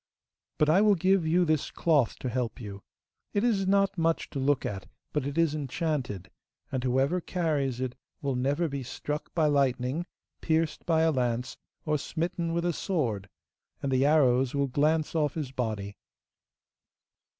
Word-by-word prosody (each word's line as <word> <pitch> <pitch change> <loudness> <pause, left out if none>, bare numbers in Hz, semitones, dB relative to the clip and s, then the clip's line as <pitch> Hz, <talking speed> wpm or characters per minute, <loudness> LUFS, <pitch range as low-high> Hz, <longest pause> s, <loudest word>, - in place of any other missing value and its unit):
But 150 - +3
I 165 +6 +5
will 210 -1 +5
give 185 -1 +2
you 175 +3 +3
this 155 -3 +1
cloth 150 -8 +2
to 130 - -2
help 120 -1 -2
you. 100 -4 -7 0.5
It 205 - +1
is 205 -6 +2
not 195 -1 +2
much 165 0 0
to 140 - -3
look 140 0 +1
at, 95 -3 -4 0.3
but 150 -2 0
it 145 +2 -4
is 165 -3 +3
enchanted, 140 - -3 0.4
and 130 -2 -2
whoever 135 +8 +1
carries 150 -9 -1
it 130 -1 -2 0.3
will 140 -2 -1
never 140 +7 +1
be 140 -2 -4
struck 150 +4 -5
by 160 -2 +3
lightning, 140 +2 +1 0.3
pierced 160 -1 0
by 160 -1 +3
a 160 - +4
lance, 125 -2 -1 0.3
or 150 -2 +1
smitten 170 +3 -2
with 170 +1 -1
a 175 - +1
sword, 120 - -2 0.5
and 140 - 0
the 130 0 +3
arrows 135 -4 +3
will 140 0 +2
glance 150 +4 +1
off 150 -3 +1
his 150 -5 -3
body. 110 -6 -3
145 Hz, 165 wpm, -28 LUFS, 130-165 Hz, 0.5 s, I